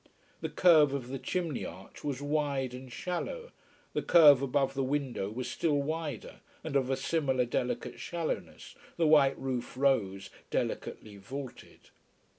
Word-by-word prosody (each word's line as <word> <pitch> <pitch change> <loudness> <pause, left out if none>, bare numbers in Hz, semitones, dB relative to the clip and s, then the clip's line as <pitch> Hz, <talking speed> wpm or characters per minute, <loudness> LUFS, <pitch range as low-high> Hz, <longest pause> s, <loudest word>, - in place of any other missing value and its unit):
The - - -2
curve 155 -6 +5
of 125 -3 -5
the 135 0 -4
chimney 170 -5 -2
arch - - -10
was 145 -1 -3
wide 145 -3 -1
and 130 0 -9
shallow, 470 - -4 0.4
the - - 0
curve 150 -6 +7
above 135 0 +1
the 135 - -1
window 130 -7 -1
was 120 +4 -4
still 150 -4 0
wider, 150 -3 -4 0.2
and 160 -3 -5
of 130 -2 +2
a 135 - +1
similar 135 -3 +1
delicate 125 +1 -2
shallowness, 170 -2 -4 0.2
the 170 - +2
white 145 -3 +5
roof 125 -2 -4
rose 100 -8 +1 0.2
delicately 105 -2 -3
vaulted. 130 +6 -9
135 Hz, 145 wpm, -30 LUFS, 125-150 Hz, 0.4 s, curve